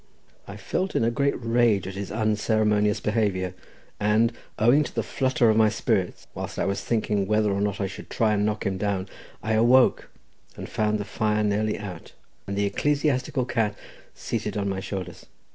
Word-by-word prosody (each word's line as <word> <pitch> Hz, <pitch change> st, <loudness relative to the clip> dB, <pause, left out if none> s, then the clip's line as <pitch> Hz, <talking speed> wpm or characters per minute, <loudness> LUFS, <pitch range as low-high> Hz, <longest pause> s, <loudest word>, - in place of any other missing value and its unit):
I -, -, -8 dB
felt 190 Hz, +1 st, -2 dB
in -, -, +2 dB
a 115 Hz, -, +2 dB
great 140 Hz, +3 st, +1 dB
rage 115 Hz, -4 st, +2 dB
at 95 Hz, -, -5 dB
his 100 Hz, 0 st, -5 dB
unceremonious 105 Hz, -1 st, +1 dB
behaviour, 100 Hz, -4 st, 0 dB, 0.5 s
and 110 Hz, +3 st, +3 dB, 0.2 s
owing 120 Hz, +7 st, +5 dB
to 130 Hz, -, -8 dB
the -, -, 0 dB
flutter 130 Hz, -2 st, +1 dB
of 110 Hz, -, +1 dB
my 110 Hz, -1 st, +5 dB
spirits -, -, -1 dB
whilst -, -, -6 dB
I -, -, 0 dB
was 100 Hz, 0 st, -2 dB
thinking 105 Hz, -4 st, 0 dB
whether 105 Hz, 0 st, +2 dB
or 100 Hz, -, -1 dB
not 100 Hz, -1 st, -1 dB
I 100 Hz, -, 0 dB
should 95 Hz, -, -8 dB
try 110 Hz, -2 st, +1 dB
and 105 Hz, -1 st, +1 dB
knock 105 Hz, 0 st, -1 dB
him 95 Hz, -1 st, -1 dB
down, 100 Hz, -2 st, -1 dB, 0.4 s
I 110 Hz, -, 0 dB
awoke, 120 Hz, +4 st, +4 dB, 0.5 s
and -, -, -7 dB
found 105 Hz, 0 st, 0 dB
the 105 Hz, -, -4 dB
fire 105 Hz, 0 st, 0 dB
nearly 105 Hz, +1 st, 0 dB
out, 100 Hz, -5 st, -8 dB, 0.3 s
and 100 Hz, 0 st, -3 dB
the 100 Hz, -, +2 dB
ecclesiastical 140 Hz, +3 st, 0 dB
cat 110 Hz, -4 st, -1 dB, 0.4 s
seated -, -, -3 dB
on 100 Hz, -1 st, -1 dB
my 95 Hz, -1 st, -2 dB
shoulders. 95 Hz, -3 st, -6 dB
105 Hz, 185 wpm, -25 LUFS, 100-115 Hz, 0.5 s, owing